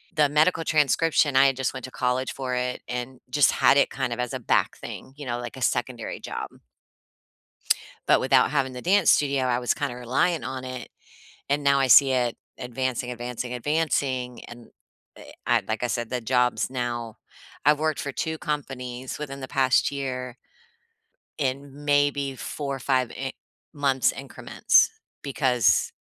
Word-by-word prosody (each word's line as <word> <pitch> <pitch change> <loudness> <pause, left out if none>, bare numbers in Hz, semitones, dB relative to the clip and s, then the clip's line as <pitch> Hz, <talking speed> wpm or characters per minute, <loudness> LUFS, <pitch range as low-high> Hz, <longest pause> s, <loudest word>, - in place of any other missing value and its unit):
The 150 -2 +4
medical 160 +3 +3
transcription, 150 0 +2
I 135 +1 +7
had 135 - +1
just 130 -1 -1
went 130 - -6
to 130 - -10
college 125 +1 -1
for 130 -2 -3
it 125 0 -2
and 125 +1 -5
just 145 +2 +4
had 140 - +4
it - - +4
kind 135 -2 -2
of 120 - -7
as 125 +1 -2
a 130 - -3
back 120 - +1
thing, 130 - -9
you 145 - -8
know, 120 0 -2
like 120 +1 -7
a - - -9
secondary 120 -1 -2
job. - - -5 1.6
But - - +5
without - - +4
having 135 -3 0
the 125 0 -8
dance 190 -1 +4
studio, 140 -2 +2
I 125 -1 +1
was 125 -1 0
kinda 140 -5 -3
relying 130 +5 0
on 130 +2 -5
it, 130 -1 -7 0.6
and 145 +1 +1
now 140 0 +4
I 135 - +2
see 135 +1 +7
it 125 -2 0 0.2
advancing, 125 0 -3
advancing, 125 +1 -5
advancing, 130 -2 -1
and 120 -1 -12 0.8
I - - +2
like - - -2
I 125 - +1
said, 120 -1 -2
the 125 -1 -2
jobs 125 +1 +1
now 120 -3 -4 0.5
I've 150 0 +5
worked 155 -1 0
for 140 - -4
2 160 +3 -3
companies 130 -4 -4
within 140 -2 -6
the 130 - -5
past 130 +1 +2
year 130 -3 -4 1.0
in 140 +1 -3
maybe, 145 -2 +1
4, 140 0 -4
5 130 -1 0
i 135 0 -5 0.4
months 140 -3 +2
increments, 135 -1 +2 0.3
because 130 -5 +2
130 Hz, 165 wpm, -25 LUFS, 125-140 Hz, 1.6 s, I